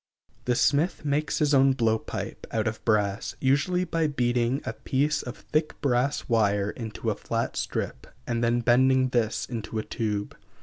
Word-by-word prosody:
The 125 - +2
smith 150 +6 +1
makes 145 +1 0
his 150 -1 +2
own 135 0 +5
blow 115 -4 +1
pipe, - - -6
out 110 -1 -1
of 110 0 -4
brass, 105 -2 0
usually 145 +7 +2
by 165 -2 0
beating 125 -1 0
a 110 - -3
piece 140 +6 0
of 120 - -7
thick 155 0 -2
brass 135 +1 0
wire 105 -3 +2
into 110 -4 -4
a - - -2
flat - - -3
strip, - - -3 0.2
and 120 0 -1
then 120 +1 +2
bending 130 +2 +4
this 115 -3 0
into 115 -2 -5
a 110 - -1
tube. 105 -2 -3
120 Hz, 170 wpm, -26 LUFS, 110-140 Hz, 0.2 s, own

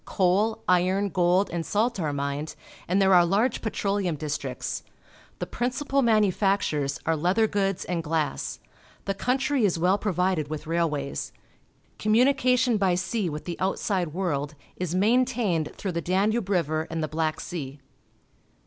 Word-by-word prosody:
Coal, 200 +4 +1
iron, 185 +3 +2
gold, 180 +1 +2
and 170 -1 -2
salt 215 +4 0
are 155 -4 -1
mined, 140 +2 -3 0.3
and 185 +3 +2
there 195 -1 +4
are 175 -1 +7
large 200 +9 +1
petroleum 200 -5 -1
districts. 140 -4 -4 0.6
The - - -3
principal 260 +4 -1
manu 215 -5 +4
factures 175 -8 0
are 165 - +2
leather 180 +8 +2
goods 195 -3 -1
and 175 -2 -2
glass. 160 -1 -2 0.5
The 195 - 0
country 265 +5 0
is 190 -5 +2
well 185 +4 +2
provided 180 -5 0
with 155 +1 -5
railways. 155 -4 -2 0.7
Communication 250 +1 +3
by 190 -3 +2
sea 185 +1 -1
with 150 0 -6
the 175 -2 -5
outside 185 -2 -1
world 150 -5 -2 0.2
is 180 -1 -3
maintained 220 -6 +2
through 195 - -3
the 170 -1 -2
Danube 195 +4 0
River 160 -4 0
and 165 -1 -2
the - - -1
Black 155 0 -1
.Sea. 145 -5 -6
185 Hz, 150 wpm, -26 LUFS, 160-210 Hz, 0.7 s, are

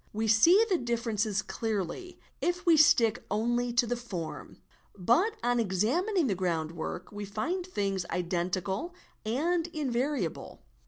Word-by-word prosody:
We 220 +1 -1
see 335 - +6
the 370 -5 +1
differences 225 -3 -1
clearly, 220 - -4 0.2
if 355 +2 -1
we 335 -2 +6
stick 240 -7 +4
only 240 +4 0
to 245 +1 +3
the 245 +1 -1
form; 195 -10 -7 0.4
but 280 - +2
on 245 0 +2
examining 255 - +1
the 220 - +1
groundwork 170 -1 -3
we 205 0 -6
find 275 - -2
things 195 - -1
— - - -24
identical 185 - -2 0.3
and 330 +8 0
invariable. 265 - -3
230 Hz, 130 wpm, -29 LUFS, 195-310 Hz, 0.4 s, see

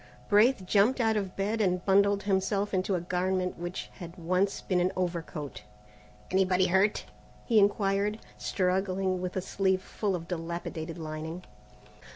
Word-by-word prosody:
Braith 210 0 +4
jumped 210 +7 +3
out 225 -2 +2
of 195 -3 -2
bed 210 +3 -1
and 180 -3 +1
bundled 200 +1 +4
himself 200 +1 0
into 190 +1 +1
a 175 - -1
garment 185 +1 -1
which 175 +1 -5
had 175 0 -9
once 185 +3 0
been 185 -2 0
an 180 +1 +2
overcoat. 170 - -4 0.7
"Anybody 185 0 +3
hurt?" 190 +3 +2 0.4
he 225 -3 +4
inquired, 200 +1 +2 0.2
struggling 185 -1 0
with 180 0 -4
a 190 - 0
sleeve 190 -1 0
full 200 -3 -2
of 170 -1 -6
dilapidated 170 -1 -4
lining. 160 +2 -6
185 Hz, 145 wpm, -29 LUFS, 180-200 Hz, 0.7 s, Braith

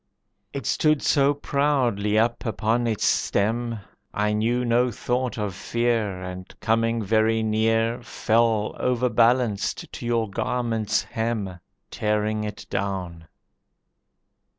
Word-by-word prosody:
It 140 - -5
stood 155 -2 +2
so 140 0 +3
proudly 130 -8 +1
up 115 +2 +1
upon 115 +1 0
its 110 -3 0
stem, 115 +2 0 0.3
I 105 +1 +1
knew 120 +4 +1
no 120 +1 +3
thought 125 +2 -2
of 105 -3 -2
fear, 110 -3 -1
And 90 0 -7
coming 115 0 +1
very 110 +2 +2
near 115 +2 +1
Fell, 115 -2 +1
overbalanced, 120 -3 +1
to - - -7
your 115 -2 +1
garment's 115 +1 -1
hem, 110 -5 -3 0.3
Tearing 105 0 0
it 105 -1 -6
down. 90 -4 -3
115 Hz, 110 wpm, -24 LUFS, 105-120 Hz, 0.3 s, so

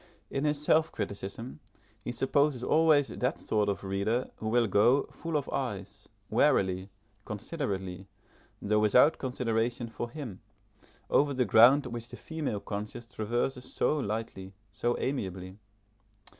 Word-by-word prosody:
In 135 +2 -1
his 150 -1 +1
self 155 +2 +3
criticism, 100 +7 -5 0.4
he - - -3
supposes 135 0 +1
always 155 -1 +4
that 125 +4 -2
sort 105 -1 0
of 100 - -3
reader 100 +6 -1
who 110 - -3
will 120 +1 +3
go 115 +7 +4
(full 165 -2 -3
of 145 - -3
eyes) 100 -6 -4 0.2
warily, 95 -6 +2 0.3
considerately, 95 - -4 0.5
though 105 +1 +1
without 125 +9 +5
consideration 120 -2 -1
for 120 +2 -5
him, 120 -9 -7 0.7
over 145 -1 +3
the 125 -1 +2
ground 120 +8 +6
which 120 -1 -6
the - - -9
female 155 -10 -4
conscience 105 +3 -6
traverses 120 +3 -2
so 150 - +1
lightly, 105 -5 -4 0.2
so 120 +4 -1
amiably. 95 -7 -4
120 Hz, 130 wpm, -30 LUFS, 100-135 Hz, 0.7 s, ground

